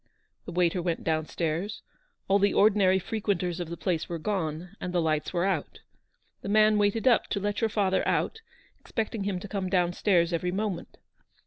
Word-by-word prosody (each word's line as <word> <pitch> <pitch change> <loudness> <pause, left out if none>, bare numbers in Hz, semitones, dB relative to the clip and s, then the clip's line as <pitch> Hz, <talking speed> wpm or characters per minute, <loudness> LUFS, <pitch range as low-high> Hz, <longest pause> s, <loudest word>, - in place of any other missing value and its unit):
The - - -6
waiter 175 0 +1
went 170 -1 -2
down 155 -1 0
stairs; 170 +5 -3 0.4
all 195 +1 +4
the 200 0 +2
ordinary 200 -3 +5
frequenters 190 -3 -2
of 175 -2 -4
the 170 - -5
place 170 -3 -2
were 170 - -3
gone, 165 -2 -3
and 180 - -3
the 180 - +1
lights 155 -2 0
were 175 0 0
out. 185 -7 -2 0.6
The - - -5
man 215 0 +5
waited 205 +4 +1
up 240 -3 +4
to 200 - -2
let 205 +2 -2
your 225 - +2
father 195 -3 +1
out, 445 - 0 0.4
expecting 220 -2 -3
him 195 -3 -1
to 205 - -8
come 195 -2 -3
down 180 -2 +2
stairs 175 -3 +2
every 180 +2 0
moment. 195 -2 -3
185 Hz, 190 wpm, -28 LUFS, 170-205 Hz, 0.6 s, ordinary